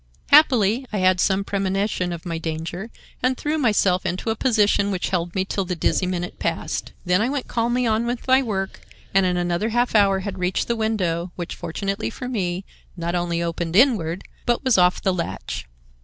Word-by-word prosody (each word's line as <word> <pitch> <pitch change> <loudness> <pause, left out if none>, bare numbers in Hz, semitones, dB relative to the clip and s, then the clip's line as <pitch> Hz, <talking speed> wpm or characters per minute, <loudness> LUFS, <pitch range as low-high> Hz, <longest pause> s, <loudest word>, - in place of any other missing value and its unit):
"Happily, 255 -5 +5
I 210 - -2
had 185 -1 +3
some 190 +2 +2
premonition 195 -2 -1
of 170 0 -6
my 165 -2 -3
danger, 165 +6 -4 0.3
and 255 +1 +1
threw 305 +1 -1
myself 200 -7 +2
into 190 +5 -2
a - - -1
position 210 -4 +2
which 185 -3 -2
held 175 -2 -2
me 190 -1 +1
till 195 0 -1
the 180 0 -3
dizzy 180 +2 +1
minute 180 -1 -4
passed. - - -2
Then 180 +2 +3
I 235 - +1
went 280 -2 -3
calmly 240 +2 0
on 225 +1 +1
with 245 +1 -3
my 260 +1 +5
work, 195 -6 -3 0.3
and 195 -1 +4
in 180 -1 0
another 175 +5 0
half 240 +2 +1
hour 195 -3 +4
had 195 -1 -5
reached 180 +1 0
the 235 - 0
window, 185 -6 -1
which, 175 -2 -5
fortunately 195 +5 -3
for 250 - -7
me, 190 -6 -2 0.3
not 170 0 -2
only 170 -1 -1
opened 170 0 -3
inward, 195 - +3 0.2
but 240 +2 +1
was 260 -3 +3
off 180 -1 +3
the 190 - +2
latch. 170 -2 -4
195 Hz, 195 wpm, -23 LUFS, 180-230 Hz, 0.3 s, Happily